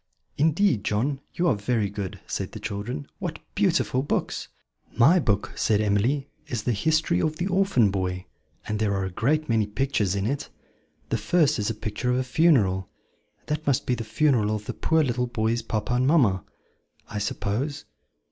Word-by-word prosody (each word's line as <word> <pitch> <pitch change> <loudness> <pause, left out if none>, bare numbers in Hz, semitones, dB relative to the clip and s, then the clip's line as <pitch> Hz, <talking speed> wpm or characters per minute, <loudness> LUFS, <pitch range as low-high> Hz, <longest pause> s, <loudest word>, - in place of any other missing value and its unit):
"Indeed, 155 - +2
John, 135 +7 0
you 175 - 0
are 165 - +4
very 105 0 0
good," 100 -1 -5
said - - -4
the - - -6
children. 100 -7 -4
"What - - -4 0.2
beautiful 130 - +2
books!" 140 - -2 0.5
"My 155 +10 +6
book," 105 - 0
said 105 -2 +2
Emily, 110 +7 +1 0.2
"is 115 -4 -3
'The 120 - +1
History 155 - +1
of 155 - 0
the 175 - -2
Orphan 190 - +3
Boy,' 90 -1 -2 0.4
and 105 0 -2
there 105 -2 +1
are 95 -1 -1
a 95 - -4
great 150 - +1
many 110 -3 +2
pictures 105 -4 0
in 100 0 -1
it: 140 +5 -2 0.6
the - - 0
first 155 -6 +2
is 105 - 0
a 115 - -2
picture 110 +3 -3
of 125 - +2
a 130 - +1
funeral 125 - +3 0.6
that 150 0 -3
must 135 -3 +2
be 125 - +1
the 120 -1 -3
funeral 115 -1 +2
of 105 0 -6
the - - -4
poor 160 -1 +2
little 125 -2 0
boy's 115 0 0
papa 115 +1 -2
and 125 +1 +2
mamma, 115 - +3 0.6
I 105 - -4
suppose." 110 +8 -2
120 Hz, 180 wpm, -25 LUFS, 105-145 Hz, 0.6 s, My